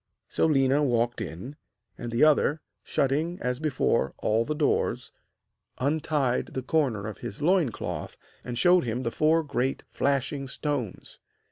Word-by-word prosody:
So - - +1
Léna 135 0 +3
walked 120 -2 +1
in, 110 - -7 0.4
and 120 0 -6
the 115 - +2
other, 155 0 +4 0.2
shutting 155 +6 0
as 125 0 -2
before 145 - 0
all 110 +2 +1
the 150 - -2
doors, 150 -1 0 0.7
untied 145 -2 0
the 130 - -2
corner 130 -8 0
of 110 -3 -6
his 100 - -6
loin 165 -3 +3
cloth - - -5 0.3
and 120 -1 -5
showed 180 +6 +5
him 120 +1 -2
the 115 - -1
four 160 +4 +3
great 135 -2 -1
flashing 140 0 -1
stones. 130 -6 -4
135 Hz, 145 wpm, -27 LUFS, 120-150 Hz, 0.7 s, showed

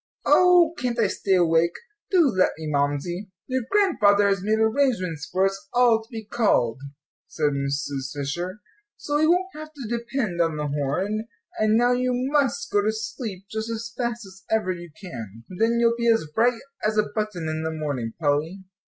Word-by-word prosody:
Oh, 355 -2 +5
can't 245 -1 -1
I 230 - +3
stay 195 0 +1
awake? 170 -1 +3 0.3
Do 370 -3 +4
let 185 -7 +2
me, 160 - -7
Mamsie." 150 +6 -1 0.2
"Your 260 0 -1
Grandfather 210 - +4
has 195 -1 +1
made 215 +3 +1
arrangements 220 - 0
for 190 +1 +2
us 195 0 -3
all 240 -2 +5
to 220 - -18
be 225 -3 -7
called," 200 - +1 0.5
said 150 -2 0
Mrs. 140 -1 -3
Fisher, 175 +8 -4 0.4
"so 290 0 -1
we 310 - +4
won't 365 +3 +2
have 310 0 -8
to 275 -7 -8
depend 235 -5 -2
on 165 -2 0
the 150 -1 -2
horn, 185 +10 -1 0.3
and 215 0 +3
now 245 +1 +4
you 250 0 +1
must 280 +1 0
go 205 - +3
to 215 +2 +1
sleep 220 -3 -6
just 220 +1 -3
as 230 0 -5
fast 235 -2 -3
as 190 0 -14
ever 215 -4 +1
you 175 -1 -7
can. 115 - -8
Then 225 +5 +1
you'll 235 0 +3
be 235 0 -1
as 225 -7 +3
bright 235 +3 +2 0.2
as 215 0 0
a 215 - +5
button 210 -6 -3
in 155 0 -2
the 160 - -2
morning, 145 -8 -3
Polly." 160 +5 0
210 Hz, 185 wpm, -24 LUFS, 165-235 Hz, 0.5 s, Oh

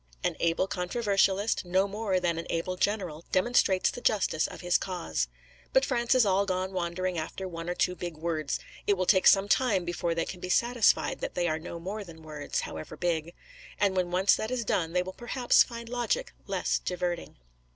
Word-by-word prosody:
An - - 0
able 170 +2 +2
controversialist 195 +2 +1
no 185 +2 +2
more 200 -2 -1
than 170 -2 0
an 165 - -6
able 170 +2 -1
general 180 -5 -1
demonstrates 190 -2 +3
the 245 - -8
justice 195 -8 +1
of - - -10
his 175 0 +2
cause. 80 - -2 0.5
But 265 +1 +5
France 240 -2 +1
is 250 -3 +5
all 200 0 +2
gone 185 0 -1
wandering 180 0 -2
after 185 +4 -5
one 165 -1 -6
or 175 - -1
two 180 - +1
big 175 -3 -6
words; 155 -3 -2 0.3
it 205 - +5
will 185 - 0
take 185 0 +5
some 195 0 +6
time 205 -6 +2
before 170 -1 -1
they 165 - 0
can 180 - -7
be 180 - -6
satisfied 240 +3 +3
that - - -4
they 175 -1 +1
are 155 -1 0
no 170 +1 -7
more 200 +5 -5
than 165 -4 -13
words, 150 -2 -3
however 155 0 -7
big; 170 -1 -1 0.4
and 200 -2 +2
when 180 -1 +1
once 185 +2 +4
that 220 - -3
is 250 -2 -2
done, 165 -4 0
they 180 0 +2
will 185 +1 -7
perhaps 240 +2 +3
find 235 -1 -1
logic 245 - -1
less - - 0
diverting. 180 -1 -3
185 Hz, 200 wpm, -29 LUFS, 170-205 Hz, 0.5 s, some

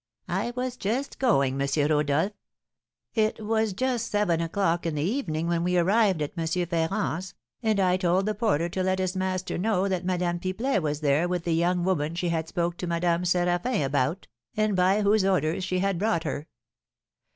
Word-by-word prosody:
"I 240 - -1
was 250 0 -3
just 245 +7 -2
going, 140 - +2
M. 140 - +1 0.2
Rodolph. 150 +5 +2 0.8
It 215 -1 +1
was 220 0 +1
just 245 +2 -1
seven 190 -6 +1
o'clock 170 0 0
in 160 - -2
the 145 - -1
evening 170 - -1
when 170 0 0
we 180 0 +1
arrived 190 -2 +3
at 145 - -5
M. 165 -2 -2 0.2
Ferrand's, 170 +1 -2 0.3
and 220 -3 +1
I 185 -1 +3
told 185 +1 +1
the 215 - 0
porter 200 -8 +1
to 185 +2 -3
let 185 0 +1
his 185 0 -1
master 185 -1 -2
know 200 -1 +1
that 185 -2 -1
Madame 180 -1 -1
Pipelet 195 +4 -1
was 150 -1 -2
there 150 +3 +2
with 180 -1 -2
the 170 - 0
young 175 +2 +1
woman 165 -4 0
she 175 0 -1
had 165 -1 -1
spoke 170 0 -2
to 180 - -4
Madame 170 0 +1
Séraphin 175 - +1
about, 140 +6 0 0.3
and 215 -2 +2
by 190 +3 +3
whose 205 0 +3
orders 185 -1 +1
she 185 0 -1
had 195 -1 0
brought 205 -5 +1
her. 150 0 -4
180 Hz, 185 wpm, -26 LUFS, 165-200 Hz, 0.8 s, arrived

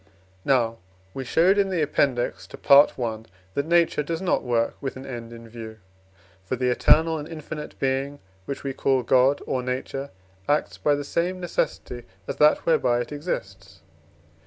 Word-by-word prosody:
Now 115 -4 +1 0.3
we 135 - -4
showed 180 +10 +3
in 195 -1 +2
the 175 -4 0
Appendix 135 -4 0
to - - -11
Part 140 +1 +6
I., 115 -4 -2 0.3
that 140 +2 -2
Nature 170 -2 +3
does 165 +2 -3
not 190 -1 +1
work 115 -2 0
with 135 -2 -4
an 130 +1 -9
end 120 -3 -7
in 115 0 -11
view. 110 -1 -9 0.7
For 95 - -2
the 125 0 0
eternal 160 +5 +4
and 150 - -7
infinite 155 -2 -8
Being, 135 +2 -1 0.3
which 140 - -5
we 135 -1 -3
call 130 -1 +1
God 130 +4 +3
or 130 - -1
Nature, 130 +2 -4 0.4
acts 145 +1 0
by 145 - +2
the 145 - -4
same 175 +5 -1
necessity 125 -8 -3 0.2
as - - -4
that 150 0 +4
whereby 120 -7 +2
it 120 - -6
exists. 145 - -6
135 Hz, 170 wpm, -24 LUFS, 120-150 Hz, 0.7 s, Part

